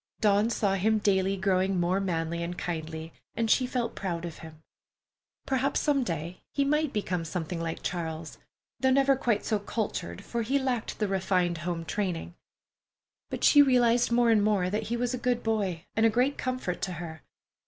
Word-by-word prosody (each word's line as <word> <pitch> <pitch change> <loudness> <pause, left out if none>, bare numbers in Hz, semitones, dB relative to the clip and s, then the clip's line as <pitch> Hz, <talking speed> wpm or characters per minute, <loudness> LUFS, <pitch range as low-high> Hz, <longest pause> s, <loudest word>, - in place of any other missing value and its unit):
Dawn 210 +1 +3
saw 205 -4 +1
him 215 +3 +2
daily 195 -2 +2
growing 190 0 +1
more 175 +2 +1
manly 170 -3 -2
and 175 +1 -4
kindly, 160 -1 -5 0.2
and 225 -1 +1
she 255 - +3
felt 245 -2 -2
proud 175 -3 -3
of 170 - -7
him. 160 -1 -12 0.8
Perhaps, 270 +1 +1
some 285 -3 +2
day, 170 -3 -4
he 280 - +1
might 300 0 +1
become 185 -5 -2
something 165 +1 -4
like 165 -1 -4
Charles, 165 -2 -4 0.4
though 260 - +3
never 275 +1 +4
quite 235 -5 0
so 215 -2 +1
cultured, 200 -2 -4
for 235 - -2
he 260 +5 +1
lacked 255 -4 -2
the 210 - 0
refined 185 -3 0
home 170 0 -3
training. 180 -3 -3 1.0
But - - -5
she 290 - +8
realized 245 -3 +4
more 235 0 +4
and 215 -2 +4
more 200 -4 +2
that 215 +1 -1
he 240 - 0
was 245 +1 -1
a 250 - -2
good 245 0 0
boy 200 -7 -1
and 220 - +2
a 225 - +6
great 250 +5 +2
comfort 255 -8 -3
to 185 - -2
her. 160 -2 -7
200 Hz, 185 wpm, -28 LUFS, 175-240 Hz, 1.0 s, she